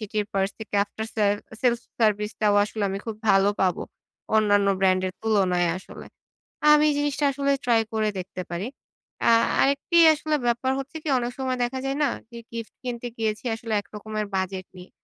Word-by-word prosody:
সেটির 210 -1 -2
পার্স 195 0 +1
থেকে 220 -2 -8
after 220 +2 -6
sale 205 -2 +3 0.3
sales 240 -2 +2 0.2
service 210 -1 +2
টাও 210 -1 +3
আসলে 215 0 -5
আমি 195 +1 -3
খুব 220 -2 -4
ভালো 195 0 +5
পাবো। 185 -2 +1 0.5
অন্যান্য 205 -2 +3
ব্র্যান্ডের 185 -1 +2
তুলনায় 185 -5 +2
আসলে। - - -12 0.7
আমি 300 0 +6
জিনিসটা 290 0 0
আসলে 280 +1 0
ট্রাই 230 -2 +4
করে 215 -1 +1
দেখতে 185 0 -6
পারি। 175 +6 -3 0.6
আ - - +6 0.3
আরেকটি 280 +5 +2 0.2
আসলে 305 0 -1
ব্যাপার 240 +2 +1
হচ্ছে 275 +3 -8
কি - - -7
অনেক 240 0 -3
সময় 260 -1 -1
দেখা 260 +2 -2
যায় 270 +1 -1
না? - - +4 0.2
যে 235 - -9
গিফট 230 -1 -6
কিনতে 245 -1 -4
গিয়েছি 220 0 -2
আসলে 225 -1 -5
একরকমের 215 +1 -5
বাজেট 190 0 -2
নিয়ে। 180 0 -12
220 Hz, 170 wpm, -25 LUFS, 200-245 Hz, 0.7 s, আমি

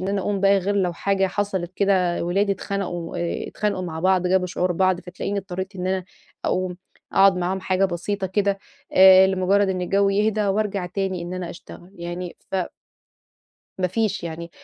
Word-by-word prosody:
إن 185 - -3
أنا 200 0 0
أقوم 195 +1 -1
بقى 200 0 +5
غير 200 +2 -1
لو 180 -3 +1
حاجة 195 +3 +1
حصلت 190 -2 -2
كده 185 -4 +2
ولادي 195 +3 +1
اتخنَقوا 180 -3 -4
آآ 170 0 -3
اتخانقوا 200 -3 -2
مع 160 -2 -5
بعض، 185 0 +3
جابوا 180 0 +2
شعور 180 0 -1
بعض، 185 0 +2
فتلاقيني 185 +3 -4
اضطريت 190 +1 -5
إن 180 0 -3
أنا 185 -1 -1 0.4
أقوم 185 -1 -1 0.4
أقعد 195 -1 +5
معاهم 180 +2 -1
حاجة 190 +1 +1
بسيطة 190 +2 -2
كده 200 +1 0 0.3
آآ 190 0 +8
لمجرد 190 +1 +2
إن 185 -1 -1
الجو 195 +2 +2
يهدا 210 +1 +1
وأرجع 195 -2 0
تاني 185 -1 -2
إن 175 +1 -5
أنا 180 -2 -4
أشتغل، 175 +1 -12
يعني 175 0 -6 0.2
ف - - +1 1.2
ما 185 - +2
فيش 210 +2 -1
يعني، 170 +1 -6
190 Hz, 175 wpm, -23 LUFS, 180-195 Hz, 1.2 s, آآ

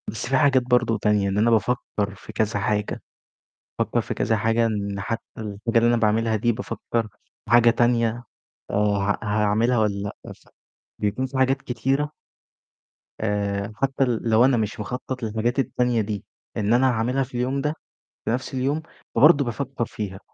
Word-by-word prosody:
بس 110 - -4
في 130 +1 +2
حاجات 130 -2 +4
برضه 125 -2 +2
تانية 105 -1 +2
إن 95 - -1
أنا 115 +3 +3
بافكّر 105 -3 0
في 110 - -12
كذا 105 0 0
حاجة، 105 0 -1 0.8
بافكّر - - +1
في - - -4
كذا 110 - +1
حاجة 115 +2 +2
إن 100 -2 -2
حتّى 115 +2 -3 0.2
الحاجة 110 +2 -1
اللي 115 +1 +4
أنا 120 - +3
باعملها 110 0 +2
دي 120 +3 +1
بافكّر 115 0 -3 0.4
في - - -12
حاجة 120 0 +7
تانية 120 0 +1 0.5
آآ - - -3
ها 100 -1 +1
هاعملها 110 +3 +2
والَّا 105 -2 +1 0.3
لأ، - - -8
ف - - -20 0.5
بيكون 105 +5 0
في 130 0 -5
حاجات 135 +1 +2
كتيرة 135 +4 -1 1.1
آآ 100 -1 -1
حتّى 135 +2 0
ل 120 -4 0
لو 115 +2 +5
أنا 130 -2 +3
مش 110 0 -2
مخطط 125 +3 -5
للحاجات 115 +4 -1
التانية 125 -3 +1
دي 105 -2 -4 0.3
إن 105 +1 +1
أنا 130 +2 +4
هاعملها 125 +3 0
في 130 - -11
اليوم 130 +3 0
ده، 150 +2 0 0.5
في - - -1
نفْس 125 +3 -3
اليوم، 135 +4 0 0.3
فبرضه 140 +3 +6
بافكّر 120 +1 -3
فيها. 95 -4 -6
115 Hz, 170 wpm, -24 LUFS, 105-125 Hz, 1.1 s, حاجة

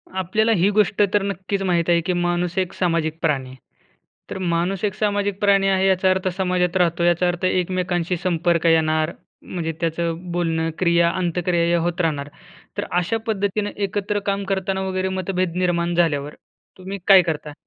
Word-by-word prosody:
आपल्याला 215 +5 +1
ही 185 +4 +3
गोष्ट 205 -1 +2
तर 205 - +3
नक्कीच 195 0 -3
माहीत 175 -3 +1
आहे, 170 -1 +4
की 180 +2 -1
माणूस 175 0 -1
एक 185 -2 0
सामाजिक 165 -3 -1
प्राणी 135 -5 0
आहे. 130 - -12 0.7
तर - - -5 0.2
माणूस 180 +3 -1
एक 200 - -1
सामाजिक 205 -2 -1
प्राणी 200 -1 +3
आहे, 190 0 +2
याचा 190 0 +3
अर्थ 185 0 +1
समाजात 180 -1 +1
राहतो, 170 -1 +1
याचा 175 +1 +3
अर्थ 175 +1 -1
एकमेकांशी 180 -1 0
संपर्क 170 -1 +1
येणार, 160 0 +2 0.3
म्हणजे 165 -3 -4
त्याचं 170 +1 -2
बोलणं, 165 -2 0
क्रिया-अंतक्रिया 170 0 +1
या 175 - +2
होत 175 +2 -1
राहणार. 145 -3 -1 0.5
तर - - -2
अशा 180 +6 0
पद्धतीनं 205 0 -1
एकत्र 205 +1 -2
काम 200 0 -2
करताना 190 0 -2
वगैरे 185 0 -1
मतभेद 185 -2 -2
निर्माण 175 -1 0
झाल्यावर, 150 -4 0 0.4
तुम्ही 190 +2 -7
काय 195 -2 +9
करता? 155 -3 -4
180 Hz, 165 wpm, -21 LUFS, 170-190 Hz, 0.7 s, काय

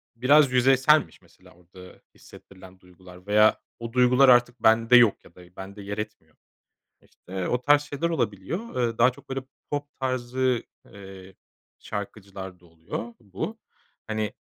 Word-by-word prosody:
biraz 135 +3 +4
yüzeyselmiş 130 - +3
mesela - - -22
orada 90 +1 -16
hissettirilen 95 -1 -16
duygular. 90 0 -17
Veya 105 +1 +4 0.2
o 115 0 -7
duygular 125 +2 +5
artık 120 -1 +3
bende 115 +2 +4
yok 120 -4 +4
ya 85 - -19
da 90 0 -17
bende 100 +2 -9
yer 100 +1 -6
etmiyor. 105 -8 -8 0.7
İşte 95 0 -7
o 125 0 -1
tarz 145 0 +4
şeyler 145 +3 -3
olabiliyor. 125 - -2
Eee, 115 0 -8
daha 125 +2 +5
çok 140 - -19
böyle 135 0 -3 0.3
pop 145 0 -3
tarzı, 130 -1 -1 0.3
eee, 95 -1 -13 0.4
şarkıcılarda 95 -3 -8
oluyor 85 +8 -8
bu. 110 - -6 0.5
Hani, 110 -1 -3
110 Hz, 135 wpm, -25 LUFS, 95-130 Hz, 0.7 s, duygular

